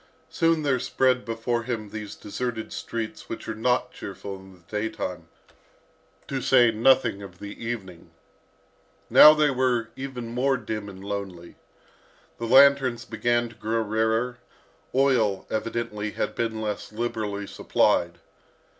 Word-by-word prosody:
Soon 165 -1 +2
there 135 -3 +1
spread 130 +1 +1
before 115 +1 -2
him 115 -4 -4
these 105 -2 -6
deserted 115 +1 -5
streets 115 -2 -5
which - - -6
are - - -2
not 125 +2 0
cheerful 100 -3 -7
in 95 0 -13
the 90 - -19
daytime, 90 -4 -4 1.0
to 135 -1 -3
say 120 -3 +5
nothing 120 -2 +3
of 95 -3 -10
the 100 +4 -9
evening. 95 -8 -6 1.0
Now 155 0 +10
they 150 -2 +3
were 125 -3 +1
even 130 -3 -6
more 130 +2 +2
dim 110 -4 -5
and 95 -1 -11
lonely. 95 -4 -6 0.8
The 115 - -3
lanterns 130 -2 +5
began 120 0 0
to 115 - -16
grow 115 +2 -1
rarer, 110 +3 0 0.6
oil, 125 -7 +2
evidently, 110 -1 -2
had - - -2
been 110 -2 -2
less 105 -1 -4
liberally 105 -3 -3
supplied. - - +1
115 Hz, 135 wpm, -25 LUFS, 105-125 Hz, 1.0 s, Now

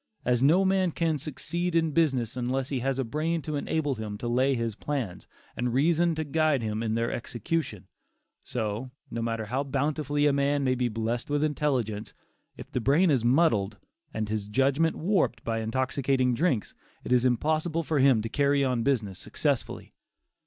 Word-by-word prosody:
As 125 -1 +2
no 165 +8 +5
man 190 -1 +2
can 160 -2 0
succeed 170 +4 -3
in 165 -1 +2
business 135 -8 +1
unless 130 +1 -1
he 135 - -1
has 135 +1 -1
a 135 - 0
brain 155 +6 -2
to 155 +2 -3
enable 145 0 -1
him 110 -3 -5
to 120 - -5
lay 130 +3 +2
his 115 -2 -2
plans, 120 -5 -4 0.3
and 125 -1 -1
reason 165 +4 +3
to 155 - -2
guide 155 -3 +1
him 110 0 -2
in 110 -1 -1
their 115 0 0
execution, 120 - -3 0.6
so, 110 +1 -3 0.2
no 115 - -3
matter 115 -1 -2
how 130 +6 -1
bountifully 145 +1 0
a 145 - +4
man 140 0 +1
may 130 -1 +2
be 125 -1 0
blessed 115 +3 -3
with 145 +1 +1
intelligence, 130 -9 -1 0.4
if - - -10
the 125 - -1
brain 150 +8 +4
is 130 -5 +2
muddled, 120 -7 +2 0.3
and 110 -1 -3
his 105 -1 -3
judgment 135 +8 +2
warped 185 +2 0
by 115 -1 -1
intoxicating 130 +2 0
drinks, 130 - 0 0.3
it - - -6
is 125 -1 +4
impossible 155 +6 +1
for 155 -1 0
him 130 -5 +4
to - - -2
carry 140 +3 +2
on 125 -3 0
business 110 -8 0
successfully. - - -2
135 Hz, 180 wpm, -27 LUFS, 115-150 Hz, 0.6 s, no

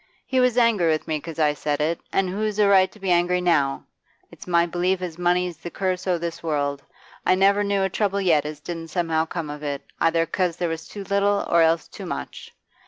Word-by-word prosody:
He 260 - 0
was 250 -1 +3
angry 230 -8 +3
with 155 -1 0
me 155 -1 -1
'cause 165 +1 -9
I 150 -2 +3
said 145 0 -2
it, 160 +3 0
an' 195 -1 +1
who's 210 +3 -2
a 210 -1 +4
right 190 -1 +5
to 215 - -17
be 190 -2 -1
angry 175 +1 +3
now? 155 -6 +1 0.5
It's - - -13
my 170 -1 +3
belief 180 +2 0
as 175 -2 -6
money's 180 -1 +1
the 175 - -7
curse 185 0 -2
o' 180 -1 +2
this 170 0 -5
world; 145 -3 -1 0.4
I 185 - +3
never 200 +2 +3
knew 200 -1 +1
a - - +2
trouble 200 +1 0
yet 165 -7 +3
as 150 0 -6
didn't 165 +1 -6
somehow 165 -1 0
come 160 -3 -4
of 150 0 -8
it, 145 -2 -4 0.2
either 165 0 +3
'cause 175 0 -1
there 175 -1 -1
was 165 0 -5
too 205 - -8
little 200 +1 +1
or 170 - +4
else 165 0 +2
too - - -9
much. - - -6
175 Hz, 230 wpm, -23 LUFS, 160-190 Hz, 0.5 s, right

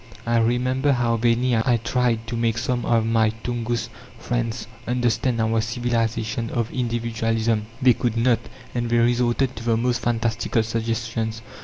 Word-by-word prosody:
I 120 0 +2
remember 125 +4 +2
how 120 -2 +1
vainly 120 +2 +2
I 120 +2 +2
tried 115 0 0
to 115 +1 -4
make 115 -1 0
some 125 0 -1
of 115 -2 +3
my 115 -1 +3
Tungus 120 -1 -2 0.3
friends 120 -1 -2 0.2
understand 120 0 +1
our 110 0 +2
civilization 115 -1 -1
of 120 -2 -2
individualism: 115 -2 -1 0.2
they 125 -2 +7
could 120 -1 -1
not, 115 0 +3 0.3
and 120 -1 -1
they 120 - +2
resorted 120 +2 +2
to 115 - -6
the 115 -1 +2
most 120 +1 0
fantastical 115 -1 0
suggestions. 115 0 -2
115 Hz, 150 wpm, -23 LUFS, 115-120 Hz, 0.3 s, they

